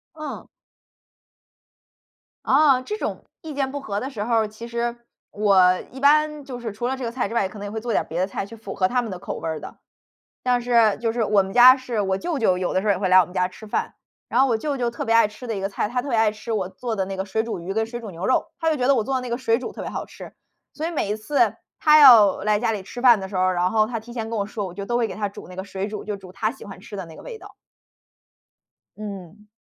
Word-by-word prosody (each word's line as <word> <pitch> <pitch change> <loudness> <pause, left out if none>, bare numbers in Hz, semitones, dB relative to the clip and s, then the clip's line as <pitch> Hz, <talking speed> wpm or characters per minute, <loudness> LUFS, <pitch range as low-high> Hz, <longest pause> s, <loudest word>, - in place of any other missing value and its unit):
嗯。 305 -1 -7 2.0
啊， 270 -2 +4
这 420 +11 -5
种 - - -4 0.2
意 315 -2 -7
见 275 -1 -1
不 285 - -4
合 205 -7 -3
的 260 - -4
时 220 -7 -4
候 235 +2 -2
儿， 220 -1 +2
其 220 +2 -10
实， 235 0 -2 0.3
我 190 -3 +4
一 265 - -9
般 300 +1 +3
就 255 -3 -7
是 235 -2 -5
除 230 +4 -3
了 265 - -1
这 265 - -7
个 230 - -2
菜 240 -3 -1
之 215 - -7
外， 200 -5 +1
可 205 - -11
能 205 - -6
也 205 - -6
会 220 0 -4
做 240 - -3
点 - - +1
别 165 +2 -4
的 185 - +1
菜 195 - -4
去 230 - -11
符 215 -3 -8
合 185 -1 +2
他 250 +3 +1
们 230 -3 -6
的 185 - -6
口 - - -5
味 - - -5
儿 160 -1 -3
的。 - - -10 0.7
但 250 -1 +2
是 235 -3 +3
就 225 -1 -1
是 235 - -1
我 210 -2 +3
们 190 0 -7
家 250 +3 +9
是 250 -4 -3
我 190 -1 0
舅 340 -4 -2
舅， 185 -7 +2
有 180 - -1
的 185 - +2
时 205 - -5
候 205 - +5
也 190 - -2
会 190 -1 0
来 185 0 +7
我 - - +3
们 180 - -14
家 180 -1 +2
吃 215 +4 -13
饭， 210 - -2 0.3
然 245 - +2
后 270 - +5
我 230 - +2
舅 285 +5 -2
舅 240 -2 -1
特 235 - -5
别 225 - +1
爱 230 -2 +5
吃 210 +4 -11
的 225 - -2
一 - - -3
个 195 - -1
菜， 205 - -2
他 250 +2 -1
特 285 - -7
别 240 - +1
爱 220 -1 +3
吃 215 +2 -9
我 195 -4 -1
做 225 +4 -5
的 190 - 0
那 195 0 -5
个 190 - -2
水 200 +3 -1
煮 230 -6 -4
鱼 185 +3 -5
跟 220 +1 0
水 240 +1 -7
煮 220 -3 -8
牛 175 +1 -5
肉， 255 - +2
他 325 - +1
就 310 - +1
觉 250 -2 0
得 275 - +6
我 225 -5 +1
做 270 - -2
的 260 - +1
那 250 - -6
个 235 - -1
水 230 -3 +1
煮 255 - -6
特 - - -7
别 - - -5
好 - - -4
吃。 - - -11 0.4
所 315 - -3
以 - - -2
每 290 -11 -2
一 210 - 0
次 230 -1 +1 0.2
他 305 0 +6
要 230 -8 +8
来 210 0 +2
家 225 0 0
里 205 -3 -4
吃 215 +6 -8
饭 240 -5 +6
的 190 - -6
时 190 - -5
候， 185 0 +3
然 180 0 +1
后 215 0 +3
他 230 0 -4
提 235 +2 -12
前 225 -2 -4
跟 230 - -2
我 200 - -1
说， 210 -1 -4
我 180 - -9
就 200 - -5
都 240 - 0
会 240 -1 +2
给 - - -7
他 210 -1 -2
煮 200 - -11
那 180 - -10
个 190 - -4
水 195 0 -4
煮 210 0 -6
就 210 0 -4
煮 190 -2 -13
他 215 +3 -1
喜 270 - -12
欢 195 -2 -10
吃 205 +1 -9
的 190 - -5
那 160 - -13
个 - - -12
味 475 -3 -8
道。 - - -14 1.4
嗯。 205 -1 -9
220 Hz, 325 characters per minute, -23 LUFS, 195-250 Hz, 2.0 s, 家